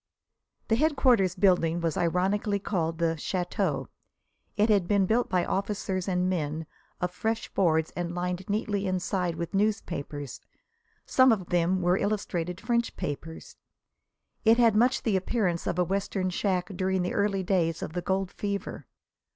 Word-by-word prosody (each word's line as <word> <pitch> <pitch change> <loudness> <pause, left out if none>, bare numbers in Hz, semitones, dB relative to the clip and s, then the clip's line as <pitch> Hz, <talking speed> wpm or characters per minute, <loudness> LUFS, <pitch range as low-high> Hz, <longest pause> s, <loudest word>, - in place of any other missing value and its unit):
The 225 - +3
headquarters 255 - +3
building 175 -3 +3
was 165 -2 -1
ironically 195 +4 +1
called 165 -5 -2
the 165 -1 +1
"château." 180 +2 -1 0.7
It 210 +1 +4
had 200 -5 +3
been 200 -2 +3
built 230 +5 +1
by 180 -2 +1
officers 195 -2 -2
and 180 -1 +1
men, 160 -3 -2 0.3
of 180 0 -1
fresh 225 +4 -3
boards 160 -4 +2
and 175 0 -3
lined 180 +1 -3
neatly 205 -1 -1
inside 185 -1 -1
with 170 0 -5
newspapers. 170 - -2 0.6
Some 260 -1 +5
of 190 -6 -1
them 175 +1 +1
were 175 +1 +3
illustrated 180 -4 -2
French 235 -1 -1
papers. 160 +3 -6 0.9
It 225 +1 +5
had 230 -3 +4
much 245 +4 +3
the 215 -4 +1
appearance 190 -3 0
of - - -1
a 180 - +3
Western 190 0 -1
shack 180 0 -1
during 190 0 0
the 180 - -2
early 200 -2 +1
days 170 -4 0
of - - -6
the 180 - -2
gold 190 0 -1
fever. 200 -1 -4
185 Hz, 150 wpm, -28 LUFS, 175-205 Hz, 0.9 s, Some